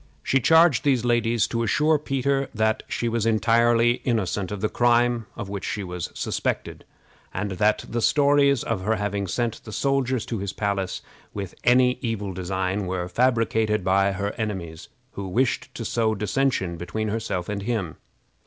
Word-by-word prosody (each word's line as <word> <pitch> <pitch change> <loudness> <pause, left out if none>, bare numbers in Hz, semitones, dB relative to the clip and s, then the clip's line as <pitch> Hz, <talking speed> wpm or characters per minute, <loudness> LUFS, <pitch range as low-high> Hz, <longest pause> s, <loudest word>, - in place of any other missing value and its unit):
She 135 - +2
charged 160 -3 +5
these 130 -4 +2
ladies 120 -2 +2
to 115 - -1
assure 150 +6 +2
Peter 135 -1 -1
that 110 0 +1
she 120 - -2
was 115 -1 0
entirely 115 +1 +3
innocent 105 -6 -1
of 105 - -4
the 110 - +1
crime 120 0 +2
of - - -6
which 100 0 -5
she 105 - -3
was 90 -1 -5
suspected, - - -3 0.5
and 100 +1 -2
that 105 +3 +1
the 120 +1 -2
stories 140 0 +3
of 110 -5 -2
her 110 +4 +1
having 100 -1 -2
sent 115 +3 -2
the 110 - -9
soldiers 130 0 0
to 115 - -4
his 100 0 -4
palace 100 -3 -2 0.3
with 100 -3 -5
any 125 +1 +4
evil 105 -6 -3
design 95 +2 -2
were 90 -1 -2
fabricated 110 -3 +1
by 95 +1 +2
her 100 +1 -2
enemies, 90 -7 -5 0.2
who 100 -1 -6
wished 120 +7 0
to 115 - -5
sow 110 -1 +1
dissension 105 -4 0
between 95 +6 -3
herself 100 -5 -3
and 105 -1 -3
him. 100 -7 -3
110 Hz, 165 wpm, -24 LUFS, 100-120 Hz, 0.5 s, charged